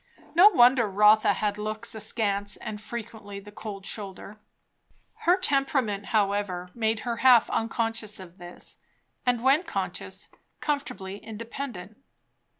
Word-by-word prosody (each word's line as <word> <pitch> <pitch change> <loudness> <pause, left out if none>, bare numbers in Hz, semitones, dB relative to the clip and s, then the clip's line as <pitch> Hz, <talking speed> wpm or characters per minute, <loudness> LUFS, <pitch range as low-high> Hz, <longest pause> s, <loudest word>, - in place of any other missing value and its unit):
No 360 +5 +8
wonder 245 - +5
Rotha 210 +2 +5
had 210 -1 -2
looks 215 +2 -3
askance 205 -2 -1
and 210 -1 -7
frequently 215 -3 -7
the 205 +1 -13
cold 205 -2 -8
shoulder. 200 0 -6 0.9
Her 355 +2 +6
temperament, 270 - 0
however, 200 -4 0
made 220 -1 0
her 235 -1 -3
half 250 -3 +5
unconscious 225 -2 -2
of 185 0 -12
this, 175 0 -11 0.5
and 245 -1 +2
when 275 +4 +5
conscious, 330 - -5 0.3
comfortably 240 -10 -3
independent. 225 -3 -7
215 Hz, 120 wpm, -27 LUFS, 200-240 Hz, 0.9 s, No